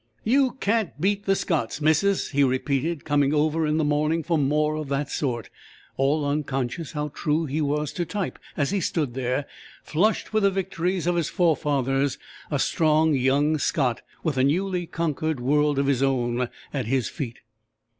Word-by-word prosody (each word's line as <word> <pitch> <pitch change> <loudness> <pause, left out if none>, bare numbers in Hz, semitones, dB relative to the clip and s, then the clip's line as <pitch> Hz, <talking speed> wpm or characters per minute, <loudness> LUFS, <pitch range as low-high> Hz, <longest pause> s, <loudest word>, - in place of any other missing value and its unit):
"You 260 +3 +3
can't 205 -5 0
beat 200 +4 0
the 195 - +4
Scots, 150 - -1
missus!" 160 +6 +2
he 140 0 +3
repeated, 140 +4 0
coming 145 0 +2
over 155 +1 +1
in 150 +1 +1
the 160 - +2
morning 150 +2 +1
for 170 - 0
"more 150 +1 +2
of 155 -2 -4
that 140 0 -1
sort," 120 -6 -2 0.4
all 145 +3 +1
unconscious 140 0 -2
how 150 0 -2
true 155 +2 -1
he 150 +2 -2
was 150 0 -1
to 175 - -1
type, 195 +2 -4 0.2
as 145 +1 +1
he 200 -1 0
stood 150 -6 -1
there, 130 +2 -1 0.4
flushed 210 +8 0
with 215 - +3
the 200 - +5
victories 185 -2 -2
of 175 0 +1
his 165 -3 0
forefathers, 140 -6 +1 0.3
a 145 - 0
strong, 155 +2 +3
young 140 +4 +2
Scot, 130 -6 0 0.2
with 155 -5 -1
a 130 - +3
newly 180 +4 0
conquered 155 -3 -2
world 145 +3 +2
of 140 - +2
his 135 -2 +1
own 125 -2 +1 0.2
at 135 -6 -2
his 130 0 +1
feet. 125 -7 -5
150 Hz, 175 wpm, -25 LUFS, 135-165 Hz, 0.4 s, the